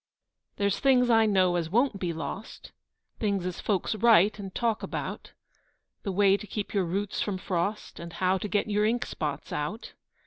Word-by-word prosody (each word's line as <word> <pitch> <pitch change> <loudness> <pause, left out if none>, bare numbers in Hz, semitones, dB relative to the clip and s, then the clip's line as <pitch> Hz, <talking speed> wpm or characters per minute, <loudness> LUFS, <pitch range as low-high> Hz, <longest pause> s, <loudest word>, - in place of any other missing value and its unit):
There's 200 -1 0
things, 250 -3 +4
I 225 -1 +5
know, 185 -3 +3
as 165 -2 -2
won't 230 +1 +2
be 180 -2 -1
lost, 165 +6 -7 0.5
Things 200 -4 0
as 180 -1 -4
folks 200 -1 0
write 215 -2 +4
and 195 -2 -6
talk 230 -3 0
about: - - -5 0.7
The 200 - -3
way 195 +1 +4
to 210 - -10
keep 205 +1 -4
your 195 -3 +1
roots 195 +4 -2
from 200 -3 -1
frost, 185 +3 -3
And 170 -1 -8
how 185 0 +1
to 210 - -3
get 205 +1 +1
your 210 0 +1
ink 235 +3 +1
spots 150 -2 -4
out. 185 +11 -4
200 Hz, 180 wpm, -28 LUFS, 185-215 Hz, 0.7 s, I